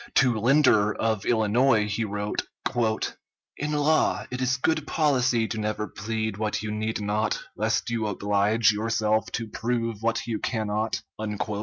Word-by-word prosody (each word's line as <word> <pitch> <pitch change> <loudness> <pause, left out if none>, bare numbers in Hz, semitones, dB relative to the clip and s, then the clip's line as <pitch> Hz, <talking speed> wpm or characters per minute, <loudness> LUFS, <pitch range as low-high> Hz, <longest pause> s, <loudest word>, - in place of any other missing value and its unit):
To 125 -4 +4
Linder, 115 -4 +4
of 110 -3 -1
Illinois, 110 0 +3
he 105 +2 -1
wrote: 105 0 -2 1.1
"In 150 +1 -3
law, 150 +1 +2
it 125 0 -4
is 130 +1 +1
good 155 +2 0
policy 130 -7 +2
to 110 - -3
never 105 0 -2
plead 110 -1 -3
what 105 0 -2
you 105 - -3
need 110 +1 -2
not, 105 +1 0 0.2
lest - - 0
you 115 -2 -1
oblige 105 +2 +2
yourself 110 0 0
to 115 - -2
prove 115 0 -2
what 115 0 0
you 115 -3 -2
cannot." 110 -1 -2
110 Hz, 145 wpm, -26 LUFS, 105-120 Hz, 1.1 s, To